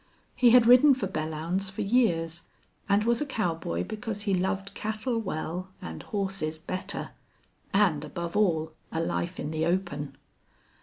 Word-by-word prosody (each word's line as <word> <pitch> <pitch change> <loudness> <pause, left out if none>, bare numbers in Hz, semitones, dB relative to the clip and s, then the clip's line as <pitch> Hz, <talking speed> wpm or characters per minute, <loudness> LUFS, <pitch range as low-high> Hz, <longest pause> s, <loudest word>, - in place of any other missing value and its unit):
He 250 -1 +5
had 240 0 +7
ridden 255 +4 +8
for 250 - -2
Belllounds 165 +3 -2
for 195 - -4
years, 175 -7 +1 0.4
and 200 +1 +4
was 235 +3 +2
a - - +1
cowboy 165 - -1
because 215 - -5
he 200 -2 +1
loved 190 +1 -1
cattle 220 +3 -2
well 180 -1 -4
and 80 -1 -7
horses 195 -6 -2
better, 185 +4 -5 0.6
and 180 -8 +3
above 170 +3 -5
all 165 -6 +2 0.2
a 160 - -2
life 170 +2 -2
in 145 - -3
the 160 +1 0
open. 170 -5 -2
190 Hz, 150 wpm, -28 LUFS, 160-210 Hz, 0.6 s, ridden